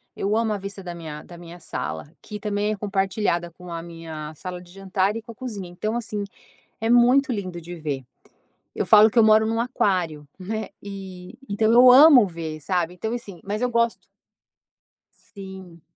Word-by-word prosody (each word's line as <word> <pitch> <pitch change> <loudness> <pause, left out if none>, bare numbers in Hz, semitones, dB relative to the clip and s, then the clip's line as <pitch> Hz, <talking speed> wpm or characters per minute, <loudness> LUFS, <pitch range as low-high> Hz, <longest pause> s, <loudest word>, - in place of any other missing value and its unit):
eu 200 +2 -1
amo 225 -1 +1
a - - -2
vista 200 0 -8
da 175 -1 -6
minha 155 -3 -8
da 175 - -12
minha 175 0 -11
sala, 150 - -5
que 210 0 -8
também 210 0 -1
é - - -1
compartilhada 195 -3 -1
com 180 +1 -12
a 165 - -4
minha 165 -2 -8
sala 180 +2 -7
de 175 -1 -16
jantar 195 +1 -1
e 230 - -4
com 230 - -11
a - - -14
cozinha 210 -7 -6
então 215 +6 -3
assim, 215 -3 -3 0.6
é 225 +1 -1
muito 250 +3 +5
lindo 185 -6 -4
de 175 +2 -9
ver. 145 -5 -4 0.7
Eu - - -2
falo 215 +1 +7
que 240 - 0
eu 225 - +7
moro 220 0 +5
em - - -1
um 225 0 0
aquário, 180 - -1
né, 215 +3 -4
e, 190 -1 -9
então 220 +2 +1
eu 250 +1 +8
amo 265 -4 +8
ver 160 -3 -6
sabe. 175 +2 -1
Então 220 +5 -4
assim 200 -8 -7
mas 210 +3 -3
eu 250 - +1
gosto. 235 0 0 1.1
Sim. 190 -4 -11
195 Hz, 190 wpm, -24 LUFS, 175-220 Hz, 1.1 s, eu